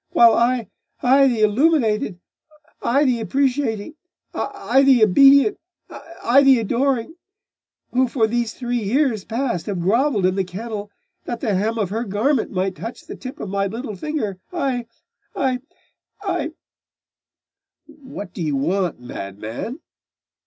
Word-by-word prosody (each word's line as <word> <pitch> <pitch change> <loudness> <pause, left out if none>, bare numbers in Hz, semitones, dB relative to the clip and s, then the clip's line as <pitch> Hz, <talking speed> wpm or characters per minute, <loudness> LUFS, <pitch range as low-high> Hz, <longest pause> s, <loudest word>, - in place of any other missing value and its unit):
while 235 -1 +6
I 235 0 +1 0.4
I 270 +2 +5
the 235 -4 0
illuminated 215 - +2 0.6
I 280 +5 +2
the 250 -3 +2
appreciating 260 - -1 0.4
I 240 +7 +1
the 265 -4 +5
obedient 275 - +6 0.6
I 260 +4 +5
the 270 -2 +6
adoring 245 - -1 0.7
who 255 +1 +2
for 235 -2 +1
these 235 0 -1
three 245 -1 -2
years 230 0 +1
past 235 -6 -2
have 195 -4 -2
grovelled 220 +2 +2
in 185 - +3
the 195 0 0
kennel, 205 +3 -6 0.4
that 240 -1 -4
the 215 - -1
hem 215 +5 0
of 200 -4 -1
her 225 +3 -1
garment 230 +5 0
might 190 0 -2
touch 230 +5 -7
the - - -8
tip 255 0 -9
of 200 - -5
my 200 0 0
little 225 +1 -6
finger 210 -5 -3
I 265 -9 -2 0.5
I 260 -2 0 0.6
I 345 -6 -2 0.7
' - - -69
'What 265 - -10
do 185 - -6
you 150 -3 -1
want, 175 +4 -1
madman? 115 - -7
235 Hz, 140 wpm, -21 LUFS, 200-270 Hz, 0.7 s, while